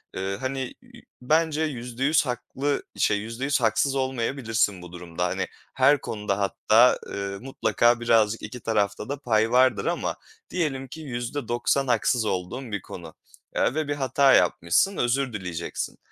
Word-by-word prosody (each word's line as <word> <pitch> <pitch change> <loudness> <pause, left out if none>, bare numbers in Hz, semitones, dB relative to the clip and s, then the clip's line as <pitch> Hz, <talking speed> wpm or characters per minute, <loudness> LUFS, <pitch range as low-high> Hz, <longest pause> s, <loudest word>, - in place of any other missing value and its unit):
eee, 95 +1 -2
hani, 130 0 -2 0.2
i - - -16 0.2
bence 155 +3 +2
%100 135 +2 0
haklı 135 +3 -2
şey 105 - +2
%100 120 +6 -2
haksız 115 +5 +2
olmayabilirsin 115 -6 0
bu 90 -1 -11
durumda. 90 0 -4
Hani, 95 +1 -1 0.3
her 140 +2 +4
konuda 105 -2 -2
hatta, 110 +4 +4
eee, 100 0 -4
mutlaka 120 -2 +2
birazcık 115 -2 +2
2 110 +4 -7
tarafta 105 0 -1
da 140 0 -3
pay 110 -4 +1
vardır 130 0 +4
ama - - -1 0.3
diyelim 140 -7 -2
ki 160 +5 -9
%90 120 0 -1
haksız 120 -1 +2
olduğun 105 +7 -3
bir 100 -2 -2
konu, 85 -4 -10 0.4
eee, - - +2
ve 155 -1 -1
bir 145 - -1
hata 135 0 +3
yapmışsın, 180 - +3
özür 125 +1 0
dileyeceksin. 90 -5 -4
120 Hz, 145 wpm, -25 LUFS, 105-135 Hz, 0.4 s, her